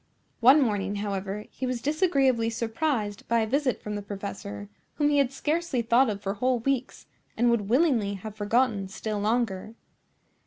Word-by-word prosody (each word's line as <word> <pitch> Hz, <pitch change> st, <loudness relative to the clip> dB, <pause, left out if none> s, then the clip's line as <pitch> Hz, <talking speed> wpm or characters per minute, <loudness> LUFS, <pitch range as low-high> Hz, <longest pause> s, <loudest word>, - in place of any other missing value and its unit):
One 265 Hz, +5 st, +7 dB
morning, 205 Hz, -3 st, -1 dB
however, 200 Hz, 0 st, -3 dB
he 260 Hz, -, -4 dB
was 250 Hz, -1 st, -2 dB
disagreeably 275 Hz, -6 st, +2 dB
surprised 225 Hz, -2 st, -2 dB
by 230 Hz, 0 st, +2 dB
a -, -, +1 dB
visit 265 Hz, +2 st, 0 dB
from 210 Hz, -, -4 dB
the 205 Hz, -, -3 dB
professor, 100 Hz, -, -6 dB, 0.3 s
whom 295 Hz, -1 st, +2 dB
he 290 Hz, -1 st, +3 dB
had 270 Hz, -2 st, +2 dB
scarcely 300 Hz, -2 st, -1 dB
thought 235 Hz, +2 st, +4 dB
of 205 Hz, -1 st, -4 dB
for 195 Hz, -, -1 dB
whole 250 Hz, +4 st, +1 dB
weeks, 260 Hz, +2 st, -2 dB, 0.3 s
and 240 Hz, +1 st, +3 dB
would 210 Hz, -4 st, 0 dB
willingly 240 Hz, -7 st, +2 dB
have 210 Hz, +2 st, -8 dB
forgotten 215 Hz, -1 st, +1 dB
still 205 Hz, +2 st, -4 dB
longer. 215 Hz, -1 st, -1 dB
230 Hz, 165 wpm, -27 LUFS, 205-260 Hz, 0.3 s, One